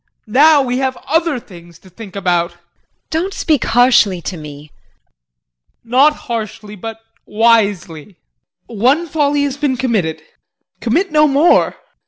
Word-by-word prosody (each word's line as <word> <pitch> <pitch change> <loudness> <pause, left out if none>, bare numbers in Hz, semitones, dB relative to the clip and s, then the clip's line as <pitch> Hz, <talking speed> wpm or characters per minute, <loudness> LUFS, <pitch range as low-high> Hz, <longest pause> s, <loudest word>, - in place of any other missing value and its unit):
Now 285 +6 +4
we 250 0 -2
have 265 -1 -2
other 320 -2 0
things 170 -6 -15
to 190 - -20
think 195 +1 -12
about. 175 -3 0
JULIE. 175 - -28 0.5
Don't 345 +5 -2
speak 305 -6 0
harshly 235 -6 +3
to 185 - -5
me. 150 -2 -11 1.1
JEAN. 230 - -20
Not 280 +4 +5
harshly, 215 -2 -6
but 225 +3 -8 0.3
wisely. 205 -6 0 0.5
One 255 +9 +1
folly 290 -2 0
has 280 -1 -3
been 285 -3 -1
committed 215 -11 -2 0.6
commit 335 +11 0
no 305 0 +4
more. 290 +5 +3
235 Hz, 135 wpm, -16 LUFS, 195-285 Hz, 1.1 s, Not